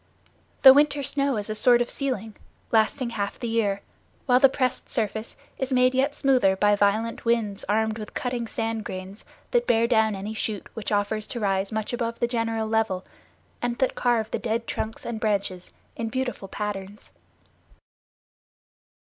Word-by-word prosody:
The 265 -1 +12
winter 290 0 +3
snow 280 -2 0
is 205 - -3
a 215 - -2
sort 240 +3 +5
of 240 - +1
ceiling, 225 -7 -3 0.4
lasting 235 +3 +2
half 200 -3 -3
the 240 - -3
year; 210 -3 0 0.4
while 250 -1 +5
the 270 - +7
pressed 255 -1 -1
surface 220 -1 -2 0.2
is 265 0 -2
made 255 0 +4
yet 275 +3 +1
smoother 255 -9 +3
by 205 +1 +3
violent 215 +3 +1
winds 225 -4 0
armed 220 +1 +1
with 210 - -8
cutting 245 -2 -2
sand 225 -1 -2
grains 190 +1 -7 0.3
that 485 0 +2
bear 230 0 +4
down 220 -3 +3
any 200 +3 -5
shoot 215 -2 -3
which 225 -2 -5
offers 205 +1 0
to 240 - -5
rise 195 -1 0
much 220 +1 -3
above 230 -1 -2
the - - +2
general 225 -2 -1
level, 220 -4 0 0.6
and 240 0 -1
that 260 +1 +1
carve 230 -3 +1
the - - -1
dead 230 0 -2
trunks 220 -1 -4
and 235 -2 -4
branches 200 -4 -1 0.2
in 225 -1 -3
beautiful 250 -4 -3
patterns. 205 0 -5
225 Hz, 165 wpm, -25 LUFS, 210-245 Hz, 0.6 s, The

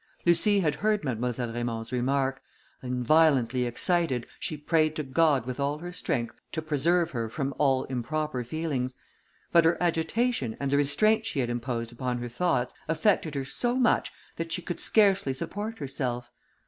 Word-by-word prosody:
Lucie 195 +4 +4
had 155 -4 +1
heard 210 +5 0
Mademoiselle 120 -2 -2
Raymond's 115 -1 -3
remark, 135 +2 0 0.4
and, 125 -1 -3
violently 135 -4 +4
excited, 130 0 +1
she 155 - -3
prayed 155 +1 +1
to 155 - -2
God 140 -2 +2
with 130 +1 -5
all 140 +1 0
her 175 +3 -7
strength 120 -9 -2
to - - -1
preserve 165 +3 +1
her 115 -3 -3
from 140 +3 -3
all 135 -3 +3
improper 135 +1 -2
feelings; 130 -2 -2 0.6
but 170 - +6
her 165 +1 +3
agitation, 175 - 0
and 140 -1 -2
the 140 - +3
restraint 180 +11 +3
she 160 - -2
had 120 -2 0
imposed 120 -1 -3
upon 125 +1 -2
her 120 0 -5
thoughts, 125 -2 0
affected 160 -2 +1
her 135 -1 -2
so 240 - -1
much, 255 -2 +2 0.3
that 165 0 -4
she 175 +1 -2
could 175 -1 -4
scarcely 195 -9 +3
support 210 +11 -5
herself. 125 -3 -4
140 Hz, 165 wpm, -28 LUFS, 125-170 Hz, 0.6 s, but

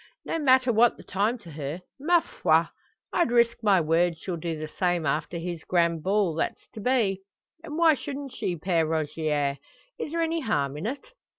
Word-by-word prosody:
No 330 - -2
matter 260 -4 +4
what 235 +2 +4
the - - -12
time 210 +6 0
to 175 -8 -13
her. 150 +3 -5 0.2
Ma 340 +4 +4
foi! - - +2 0.5
I'd 345 - +2
risk 235 -1 +3
my 200 -4 +4
word 165 +1 +2
she'll 180 +2 -4
do 165 -1 -4
the 155 0 -5
same 175 0 0
after 155 +4 -1
this 170 -1 -5
grand 170 -2 +1
ball 195 -1 +1
that's 160 - -3
to - - -8
be. 210 -5 +1 0.4
And 315 -2 -6
why 330 -2 +6
shouldn't 280 -1 -6
she, 180 - -2
Pere 170 0 +1
Rogier? 150 -3 -1 0.4
Is 300 - -4
there 335 0 0
any 330 0 0
harm 145 - -1
in 155 +8 -4
it?" 290 - -6
185 Hz, 190 wpm, -26 LUFS, 160-255 Hz, 0.5 s, why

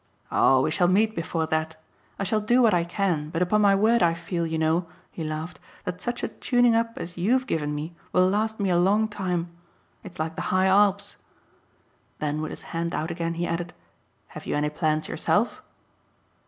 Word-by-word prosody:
"Oh 130 -1 +4
we - - 0
shall 175 +2 +2
meet 215 +4 +3
before 165 -1 -2
that. 160 0 -2 0.4
I - - -2
shall 215 +2 0
do 240 +4 +3
what 225 - +5
I 175 -1 +3
can, 170 -4 -1
but 165 +3 0
upon 210 +4 +2
my 200 -1 +5
word 225 +4 +3
I 165 -1 +3
feel, 170 0 -3
you 160 0 -2
know," 160 +2 +1 0.2
he 165 - -6
laughed, 155 +2 -5 0.2
"that 180 - -5
such 240 0 -3
a - - +1
tuning 245 -2 +2
up 230 0 +1
as 175 +1 -6
YOU'VE 250 +8 +2
given 150 - -2
me 155 +3 -5 0.2
will 185 0 +4
last 220 +3 0
me 195 -2 +1
a 175 - +3
long 205 +5 +3
time. 180 -5 -3 0.5
It's 180 - -11
like 160 +1 -3
the - - -4
high 185 0 +3
Alps." 200 +1 +3 1.0
Then 150 0 -2
with 155 - -3
his - - -9
hand 170 +1 -2
out 160 +2 -2
again 170 -1 -3
he 170 +1 -1
added: 175 +1 -3 0.5
"Have - - -10
you - - -1
any 150 0 0
plans 155 0 0
yourself?" - - 0
175 Hz, 200 wpm, -25 LUFS, 160-205 Hz, 1.0 s, what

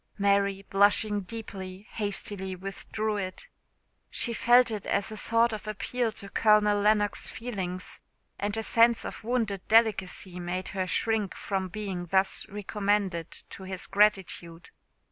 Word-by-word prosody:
Mary, 200 -1 +1
blushing 205 +1 +3
deeply, 190 -2 -8
hastily 200 -2 -4
withdrew 205 +3 -3
it. 185 -2 -5 0.6
She 235 - +1
felt 240 +1 +5
it 210 -2 -5
as 200 +2 0
a - - -5
sort 230 +2 +3
of 215 0 -6
appeal 225 +3 -2
to 200 - -7
Colonel 210 -1 +4
Lennox's 210 0 +1
feelings; 190 -6 -5 0.4
and 205 +1 -2
a 225 - -2
sense 230 +1 +4
of - - -7
wounded 220 -5 -1
delicacy 195 -5 +2
made 180 +1 -4
her 190 -2 -2
shrink 220 -1 0
from 190 -2 -2
being 185 -2 -5
thus 190 +2 +3
recommended 200 -4 -1 0.2
to - - -9
his 190 0 -4
gratitude. 190 -5 +1
205 Hz, 135 wpm, -28 LUFS, 190-215 Hz, 0.6 s, felt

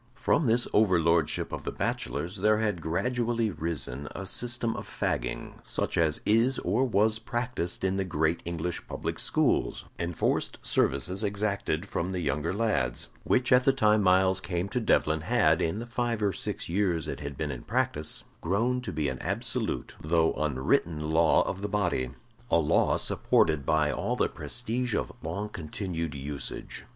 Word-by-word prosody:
From 135 +2 +2
this 120 +2 +3
overlordship 85 -6 +3
of - - -5
the - - -3
bachelors 90 +5 -3
there 110 0 +3
had 105 -6 -1
gradually 115 +6 0
risen 75 -5 -3
a 95 - -5
system 120 +2 -1
of - - -6
fagging, - - -3
such - - -2
as 80 -3 +2
is 115 +5 +3
or 105 +9 +1
was 110 -2 +2
practised 120 -7 -3
in 95 0 +1
the 95 - +1
great 80 -2 0
English 85 0 -3
public - - -3
schools - - +1
enforced 85 -1 -1
services 90 - +1
exacted 100 -4 -1
from 90 0 -2
the 90 - -2
younger 75 0 -1
lads 100 - 0
which 125 +1 +2
at 125 0 +6
the 135 - +5
time 110 -5 +3
Myles 95 0 +4
came 90 +1 -2
to 110 - -1
Devlen 80 -7 +2
had, 80 -5 +3
in 80 +5 0
the 115 - -4
five 120 -2 -1
or 100 -2 +2
six - - -3
years 90 -3 0
it - - -4
had 70 -2 -6
been 75 -2 -2
in 65 - -6
practice, 75 +1 0 0.2
grown 115 +8 +1
to 115 -6 -5
be 75 -3 -1
an 65 -1 -3
absolute 115 +4 -2
though 80 +1 +2
unwritten 75 +2 0
law 80 0 +4
of 95 - -4
the 105 - -2
body 90 -11 0 0.4
a - - +4
law 80 -3 +3
supported 75 -4 +2
by 75 -1 +3
all - - -1
the - - +2
prestige 120 - -2
of - - -1
long 100 +7 -3
continued 85 -3 -4
usage. 70 +1 -5
90 Hz, 165 wpm, -28 LUFS, 80-110 Hz, 0.4 s, at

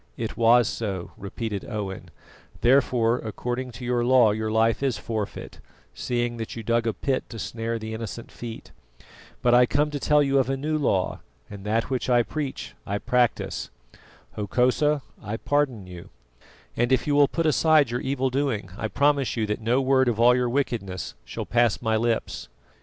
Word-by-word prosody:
"It 115 - -4
was 120 0 +5
so," 95 -7 -4
repeated 100 +1 -5
Owen; 105 -4 -5 0.5
"therefore, 125 -2 +3
according 125 +3 -4
to 120 +2 -8
your 120 -1 +1
law 120 -3 +5
your 110 +1 -2
life 110 +1 +2
is 135 -3 0
forfeit, 110 -3 -5 0.3
seeing 120 -1 -2
that 115 -1 -5
you 115 - -6
dug 115 +1 +1
a 115 - +1
pit 135 -2 -1
to 115 - -8
snare 115 +1 -3
the 110 0 -6
innocent 115 +1 -6
feet. 115 -2 -8 0.7
But 120 - +4
I 125 0 +6
come 150 +4 +1
to 145 - -3
tell 150 +2 +3
you 140 -1 +2
of 135 - +1
a 135 - 0
new 155 +3 -2
law, 110 -11 0 0.3
and 100 -1 -9
that 115 +4 0
which 130 0 -1
I 120 -1 +4
preach 145 +1 -5
I 100 - -2
practise. 120 +2 0 0.6
Hokosa, 130 +7 +1 0.2
I 105 +2 -4
pardon 135 -9 0
you, 90 -1 -10 0.7
and 120 +2 +1
if 130 - +3
you 145 - +1
will 145 0 +5
put 165 +3 -2
aside 155 -3 +4
your 120 - -2
evil 135 -1 -1
doing, 125 -9 -1
I 110 - -1
promise 140 +1 +1
you 110 - +1
that 105 +1 -3
no 120 +4 +2
word 130 -1 +3
of 115 -2 0
all 120 +1 +6
your 125 -1 +1
wickedness 115 -9 -2
shall - - -5
pass 120 -2 +2
my 110 -2 0
lips." 115 - -1
120 Hz, 180 wpm, -25 LUFS, 110-130 Hz, 0.7 s, I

